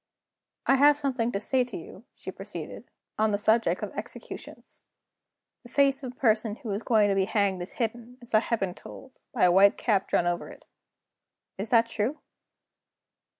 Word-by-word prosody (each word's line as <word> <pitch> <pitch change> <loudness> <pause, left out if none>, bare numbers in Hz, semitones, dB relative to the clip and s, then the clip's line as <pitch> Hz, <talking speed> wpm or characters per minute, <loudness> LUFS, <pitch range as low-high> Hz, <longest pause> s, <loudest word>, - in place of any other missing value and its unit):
"I 270 - +4
have 290 +2 +6
something 260 -5 -1
to 200 - -2
say 255 +5 +1
to 245 -3 -7
you," 190 +6 -12
she - - -7
proceeded, - - -8 0.3
"on 220 0 +3
the 205 - +1
subject 220 +2 +2
of - - -4
executions. - - -8 0.8
The 240 - -15
face 275 +1 +2
of 255 -2 -6
a - - -30
person 220 -3 +1
who 235 -4 -7
is 200 +2 -2
going 215 -4 +3
to 195 - +1
be 190 -1 +2
hanged 200 -3 0
is 175 - -7
hidden, 240 +1 -4
as 240 -1 -10
I 215 - +7
have 230 0 -1
been 190 -2 -2
told, 260 +7 -13
by 245 - 0
a 180 - +6
white 200 +4 +5
cap 200 -5 +1
drawn - - +1
over 175 0 -2
it. - - -14 0.9
Is 205 - -2
that 230 -1 +5
true?" 230 +5 -2
225 Hz, 190 wpm, -27 LUFS, 200-250 Hz, 0.9 s, I